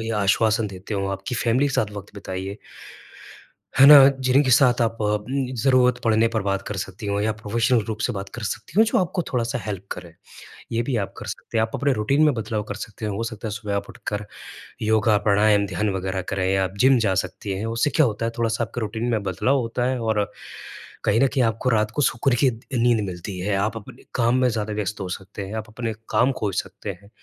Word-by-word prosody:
या 110 -1 -2
आश्वासन 110 +2 +2
देते 95 +3 -7
हो, 100 0 -1
आपकी 95 +5 -4
फैमिली 120 +4 +2
के - - -4
साथ 105 -1 +1
वक़्त 100 0 -9
बिताइए। 95 0 -5 1.2
है 135 - +9
ना? 150 0 +11 0.3
जिनके 130 +1 +4
साथ 125 -2 +5
आप 115 0 0
उम, 105 0 0 0.4
ज़रूरत 130 -2 +4
पड़ने 115 0 +3
पर 110 - +1
बात 100 0 -1
कर 105 - -4
सकती 95 +2 -6
हो 100 0 0
या 110 +1 +1
प्रोफ़ेशनल 115 +3 +1
रूप 110 -1 -3
से 125 - -2
बात 95 -1 -5
कर 120 - -6
सकती 110 - -4
हो - - +8
जो 225 - +1
आपको 180 -1 0
थोड़ा-सा 120 0 -1
हेल्प 100 -2 -5
करें। 85 -2 -10 0.6
ये 115 +1 +1
भी 125 -1 -2
आप - - -13
कर - - -8
सकते 115 - -4
हैं - - +4
आप 110 - -1
अपने 140 -1 +1
रूटीन 135 +7 +1
में 150 - +4
बदलाव 110 -1 -2
कर - - -2
सकते 110 +1 -8
हैं। 105 - -1
हो 110 +4 -3
सकता 115 -1 -6
है - - -4
सुबह 105 -2 -3
आप 100 - -4
उठकर 105 0 -5 0.6
योगा, 110 -1 +3
प्राणायाम, 105 0 +4
ध्यान 95 +4 -1
वगैरह 95 0 -2
करें 95 0 +1
आप 95 +1 -1
जिम 130 0 +6
जा 95 - +1
सकती 95 +2 -7
हैं, 110 - -3
उससे 115 +6 0
क्या 155 +1 +3
होता 115 0 -2
है 115 - -1
थोड़ा-सा 115 0 0
आपके 115 +2 -5
रूटीन 110 +2 -3
में 110 -2 +1
बदलाव 100 +9 +1
होता 120 +1 -2
है 130 -1 -1
और 105 -2 0 0.7
कहीं 110 +3 +2
न 135 - +5
कहीं 130 -1 +1
आपको 115 +3 0
रात 110 -2 +1
को - - +1
सुकून 125 0 +2
की 130 - +6 0.3
नींद 120 -1 +3
मिलती 90 +1 -6
है 100 +3 -1
आप 105 +3 0
अपने 105 - -12
काम 120 +1 +2
में 125 - +4
ज़्यादा 110 -1 -2
व्यस्त 105 0 -3
हो 95 - -3
सकते 95 +2 -7
हैं, 100 - -8
आप 110 -1 -4
अपने 115 0 -4 0.2
काम 130 +3 +3
खोज 100 -4 -2
सकते - - -9
हैं। 100 - -18
110 Hz, 230 wpm, -23 LUFS, 100-120 Hz, 1.2 s, ना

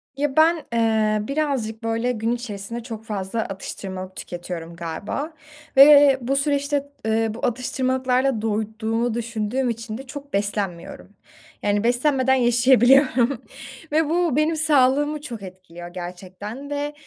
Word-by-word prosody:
Ya, 280 -1 -1
ben, 320 +2 +6 0.2
ııı, 220 -2 +1
birazcık 270 -7 -2
böyle 230 +2 0
gün 225 0 -1
içerisinde 235 -1 -5
çok 225 -2 -7
fazla 205 0 -3
atıştırmalık 190 -1 -6
tüketiyorum 175 -1 -7
galiba 185 - -5 0.4
ve 285 -1 +8
bu 260 +3 -1
süreçte, 285 0 0 0.2
ııı, 220 0 +1
bu 225 - -3
atıştırmalıklarda 255 0 0
doyduğumu 220 +2 -1
düşündüğüm 235 +2 -2
için 230 -1 -5
de 270 +1 -10
çok 285 +1 -9
beslenmiyorum. 200 -4 -3 0.5
Yani, 205 0 +1
beslenmeden 260 +2 +2
yaşayabiliyorum 250 +1 +4 0.5
ve 310 0 +2
bu, 335 -4 +1
benim 310 +2 +2
sağlığımı 295 -1 +3
çok 235 -8 -7
etkiliyor 180 -2 -10
gerçekten 185 +8 -8
ve 290 0 -3
235 Hz, 125 wpm, -23 LUFS, 210-275 Hz, 0.5 s, ve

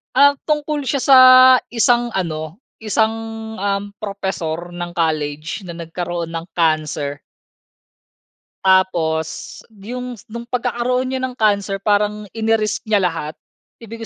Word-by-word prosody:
Ah, 285 +1 +7 0.2
tungkol 300 -2 -1
siya 275 -3 0
sa 270 -2 +7 0.5
isang 240 0 +2
ano, 160 -3 -3 0.2
isang, 220 0 +1 0.5
um, 200 0 -2
propesor 175 -4 -4
ng 175 0 -6
college 155 0 -2
na 170 - -7
nagkaroon 170 0 -5
ng 165 0 -5
cancer. 155 -3 0 1.4
Tapos 170 -4 +1 0.2
yung 250 +2 -6
nung 235 +1 -7
pagkakaroon 250 +1 -1
niya 260 0 -2
ng 255 -1 -7
cancer 200 -3 0
parang 210 +1 +1
ini-risk 225 -1 0
niya 205 -2 +3
lahat. 165 -3 -2 0.5
Ibig 230 0 -8
200 Hz, 115 wpm, -19 LUFS, 165-235 Hz, 1.4 s, Ah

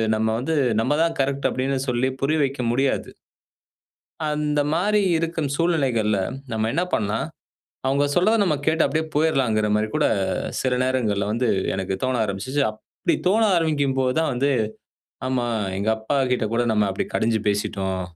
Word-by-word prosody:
நம்ம 110 +1 0
வந்து, 160 +6 -1 0.3
நம்ம 145 +5 +1
தான் 165 -1 -1
கரெக்ட்டு." 140 +1 0
அப்படீன்னு 135 +1 -1
சொல்லி 125 +2 +1
புரிய 155 +3 +1
வைக்க 135 -1 -4
முடியாது. 135 +2 0 1.2
அந்த 150 -1 0
மாதிரி 205 +5 +2 0.2
இருக்கும் 160 -3 -2
சூழ்நிலைகள்ல 135 -11 +1 0.3
நம்ம 110 -1 0
என்ன 170 +4 +1
பண்ணலாம், 105 -1 0 0.6
அவங்க 140 +2 +2
சொல்றத 205 +6 +4
நம்ம 160 -6 +2
கேட்டு 160 +1 +3
அப்படியே 160 0 0
போயிறலாம்கிற 130 -9 +2
மாதிரி 105 +1 +1
கூட - - +2 0.6
சில 130 -1 +1
நேரங்கள்ல 115 -6 0
வந்து 120 +2 0 0.3
எனக்கு 95 0 -2
தோண 130 0 +1
ஆரம்பிச்சுச்சு. 105 +8 -2
அப்படி 110 +9 -3
தோண 210 +5 +3
ஆரம்பிக்கும்போதுதான் 145 -2 +1
வந்து, 135 +3 +1 0.8
"ஆமா, 130 -2 0 0.3
எங்க 100 +3 -2
அப்பா 110 +6 -2 0.2
கிட்ட 125 -2 0
கூட 120 +1 +2
நம்ம 105 -1 +2
அப்படி 95 - -2
கடிஞ்சு 110 -1 +1
பேசிட்டோம், 95 -2 -1
130 Hz, 145 wpm, -23 LUFS, 110-155 Hz, 1.2 s, சொல்றத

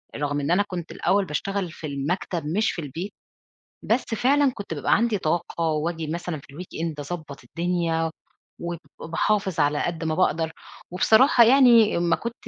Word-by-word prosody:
رغم 145 0 -1
إن 145 +3 -1
أنا 190 +3 +4
كنت 175 -4 -6
الأول 200 0 +1
باشتغل 185 +3 -3
في 155 - -7
المكتب 155 +4 -3
مش 195 +9 +1
في 170 - -5
البيت، 165 +8 -6 0.7
بس 235 +4 +1
فعلًا 275 +4 +3
كنت 200 -5 -6
بابقى 145 - +2
عندي 225 -1 +1
طاقة 170 0 -2
وآجي 160 +1 -2
مثلًا 170 0 -4
في 140 0 -17
الweekend 165 -1 -5 0.2
أضبّط 150 -7 -7
الدنيا 165 +2 -1 0.5
وب 170 0 -3 0.2
باحافظ 190 +2 0
على 145 0 +2
قد 165 -2 -3
ما 155 -1 -1
باقدر، 165 -3 +1 0.4
وبصراحة 235 +7 +5
يعني 235 -4 +6
أمّا 170 0 +2
كنت 235 0 -5
170 Hz, 160 wpm, -24 LUFS, 155-200 Hz, 0.7 s, يعني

